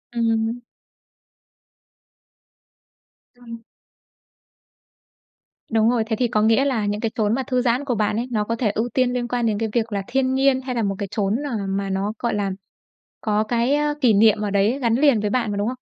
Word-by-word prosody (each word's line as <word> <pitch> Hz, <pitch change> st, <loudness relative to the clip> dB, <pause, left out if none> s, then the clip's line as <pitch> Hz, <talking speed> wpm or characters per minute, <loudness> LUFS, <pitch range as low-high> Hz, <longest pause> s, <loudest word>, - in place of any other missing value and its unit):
Ừm. 230 Hz, 0 st, 0 dB, 2.8 s
Ừm. 230 Hz, -2 st, -11 dB, 2.1 s
Đúng 225 Hz, 0 st, +3 dB
rồi. 240 Hz, -2 st, +1 dB
Thế 225 Hz, -, 0 dB
thì 245 Hz, +2 st, +1 dB
có 215 Hz, -2 st, 0 dB
nghĩa 225 Hz, +5 st, +3 dB
là 235 Hz, -7 st, 0 dB
những 205 Hz, +1 st, -2 dB
cái 225 Hz, -1 st, -1 dB
chốn 215 Hz, -1 st, +1 dB
mà 265 Hz, -, -2 dB
thư 255 Hz, -1 st, +1 dB
giãn 250 Hz, +3 st, 0 dB
của 245 Hz, -4 st, -1 dB
bạn 210 Hz, 0 st, 0 dB
ấy, 235 Hz, +3 st, -2 dB
nó 210 Hz, -2 st, 0 dB
có 230 Hz, +2 st, -2 dB
thể 225 Hz, -3 st, 0 dB
ưu 225 Hz, +3 st, -2 dB
tiên 255 Hz, -1 st, +1 dB
liên 245 Hz, -1 st, -2 dB
quan 240 Hz, -1 st, -1 dB
đến 215 Hz, -2 st, 0 dB
cái 225 Hz, 0 st, -2 dB
việc 230 Hz, -2 st, 0 dB
là 200 Hz, -1 st, -1 dB
thiên 260 Hz, 0 st, 0 dB
nhiên 265 Hz, 0 st, +2 dB
hay 255 Hz, -1 st, -4 dB
là 230 Hz, -, 0 dB
một 195 Hz, -1 st, -1 dB
cái 200 Hz, -, -3 dB
chốn, 205 Hz, 0 st, 0 dB
ờ, 230 Hz, -, -2 dB
mà 195 Hz, 0 st, -2 dB
nó, 195 Hz, +2 st, -2 dB
gọi 235 Hz, -, -1 dB
là 200 Hz, -2 st, -1 dB, 0.7 s
có 215 Hz, 0 st, 0 dB
cái, 240 Hz, +4 st, +1 dB
ơ, 295 Hz, 0 st, 0 dB
kỷ 245 Hz, -6 st, +4 dB
niệm 215 Hz, +1 st, +4 dB
ở 210 Hz, -1 st, -2 dB
đấy 200 Hz, +6 st, +1 dB
gắn 235 Hz, -4 st, +1 dB
liền 270 Hz, -4 st, +3 dB
với 210 Hz, -1 st, -1 dB
bạn 235 Hz, -3 st, 0 dB
mà, 205 Hz, -, -3 dB
đúng 205 Hz, +3 st, -1 dB
không? 255 Hz, -, -4 dB
230 Hz, 205 wpm, -22 LUFS, 210-250 Hz, 2.8 s, kỷ